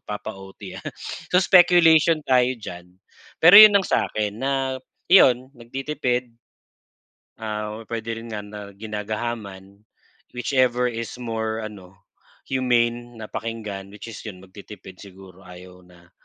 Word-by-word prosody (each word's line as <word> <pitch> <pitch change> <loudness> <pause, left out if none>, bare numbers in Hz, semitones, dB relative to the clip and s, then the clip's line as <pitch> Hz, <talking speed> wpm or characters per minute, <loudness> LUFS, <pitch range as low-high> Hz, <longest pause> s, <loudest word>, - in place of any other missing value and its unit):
papa-OT 95 -2 -8
ha. - - -22 0.5
So 180 - +5
speculation 170 -3 +5
tayo 125 -1 +3
diyan, 90 -5 -10 0.5
pero 175 +4 +9
yun 215 -1 +9
ang 195 - -3
sa - - +1
akin 105 -1 -2
na 135 +3 -2 0.6
iyon 130 -8 +5
nagtitipid. 125 0 -3 1.1
Ah, 105 0 -5
puwede 115 0 -5
rin 115 0 -9
nga 105 - -4
na 105 0 -10
ginagahaman, 105 -1 -6 0.5
whichever 125 -1 +1
is 115 -1 -6
more 110 -1 -3
ano 100 -4 -10 0.6
humane 120 -2 0
na 105 - -8
pakinggan, 105 -4 -6
which 105 - -10
is 115 - -9
yun 95 -4 -9
nagtitipid 95 0 -13
siguro 95 -1 -15
ayaw 90 0 -14
na 85 -1 -21
110 Hz, 125 wpm, -23 LUFS, 100-125 Hz, 1.1 s, pero